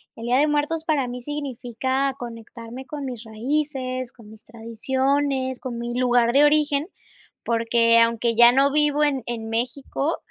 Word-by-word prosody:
El 230 - -8
día 245 +1 +3
de 295 +3 +3
muertos 300 +2 -1
para 290 -6 0
mí 245 +1 -6
significa 265 -1 -2
conectarme 235 +1 -9
con 295 -2 -6
mis 245 -3 -6
raíces, 255 +2 -3
con 225 -4 -16
mis 220 0 -13
tradiciones, 260 +4 -1
con 250 -3 -5
mi 235 0 -4
lugar 245 -1 +2
de 280 +2 +6
origen, 295 0 +2 0.6
porque 230 0 +3
aunque 230 0 +2
ya 240 +1 +8
no 275 +1 +3
vivo 295 0 +2
en 275 -4 0
en 225 -2 -4
México, 265 +6 -2
255 Hz, 155 wpm, -23 LUFS, 235-285 Hz, 0.6 s, ya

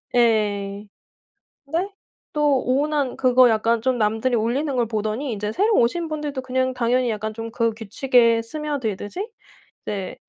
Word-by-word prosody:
예. 205 -4 +1 0.8
근데 335 +7 -1 0.4
또 295 -4 +2
오운완 280 0 0
그거 255 -1 +5
약간 225 +1 +2
좀 255 +1 +1
남들이 225 +3 +1
올리는 250 +6 0
걸 240 -2 +2
보더니 220 +4 -2
이제 210 0 -3
새로 420 - +2
오신 330 +9 +2
분들도 295 -3 -4
그냥 260 0 -1
당연히 250 0 +1
약간 215 0 -3
좀 225 +1 -6
그 230 0 +1
규칙에 230 +1 +2
스며들듯이 280 - -4 0.6
이제 195 -3 -4
240 Hz, 290 characters per minute, -22 LUFS, 220-275 Hz, 0.8 s, 그거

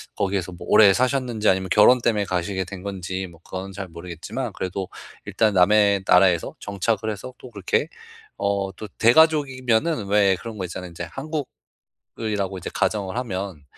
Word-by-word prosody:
거기에서 95 -2 -1
뭐 85 - -10
오래 100 -3 +7
사셨는지 125 -2 0
아니면 95 -1 +2
결혼 120 +5 +6
때문에 105 -4 +1
가시게 95 +1 -2
된 95 -1 -9
건지 95 -1 -4
뭐 85 -2 -16
그건 95 +1 -6
잘 95 -1 -6
모르겠지만 90 - -6
그래도 95 0 -4 0.4
일단 110 -2 +1
남의 100 +1 +4
나라에서 90 -2 +4
정착을 110 +2 -2
해서 115 +5 -8
또 125 - -12
그렇게 105 - -1 0.5
어 100 -1 -1
또 110 - -8
대가족이면은 130 -2 +3
왜 100 -2 +4
그런 110 +2 -8
거 95 - -3
있잖아요. 90 +1 -7
인제 85 +1 -7 0.9
한국이라고 100 -4 -4
이제 85 - -6
가정을 95 +1 -1
하면 95 - -5
100 Hz, 365 characters per minute, -23 LUFS, 95-110 Hz, 0.9 s, 오래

